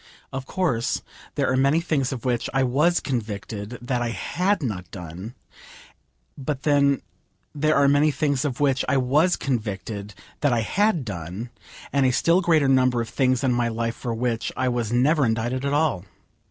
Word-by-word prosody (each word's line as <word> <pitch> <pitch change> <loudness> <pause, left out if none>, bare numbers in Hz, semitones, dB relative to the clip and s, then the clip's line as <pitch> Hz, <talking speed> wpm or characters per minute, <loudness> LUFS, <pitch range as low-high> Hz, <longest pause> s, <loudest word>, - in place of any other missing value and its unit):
Of 135 0 -5
course 130 -11 0 0.3
there - - +1
are - - +2
many 140 +4 +3
things 150 -6 0
of 130 -3 -6
which 120 -2 0
I 135 - +3
was 150 +8 +2
convicted 110 -2 -4
that 125 0 -1
I 120 - -1
had 180 - -1
not 95 -8 -4
done, 90 +6 -8 1.0
but 140 0 -4
then 140 -2 +3 0.5
there 155 +1 +1
are 140 0 +4
many 145 +2 +4
things 140 -2 0
of 135 -5 -2
which 135 -2 +2
I 140 - +3
was 145 +8 +3
convicted 105 -4 -4 0.2
that 145 - +2
I 115 - +2
had 185 - +1
done, 95 +4 -6 0.4
and 140 -1 +3
a - - +3
still 170 +8 +3
greater 160 -5 +3
number 130 -2 +3
of 115 -1 -3
things 130 -1 +1
in 130 -2 +2
my 120 -1 +1
life 115 0 -2
for 120 -2 -4
which 115 -1 -1
I 130 - +1
was 120 -3 -1
never 140 +5 +3
indicted 120 +3 0
at 140 - 0
all. 145 - +1
130 Hz, 180 wpm, -24 LUFS, 115-145 Hz, 1.0 s, are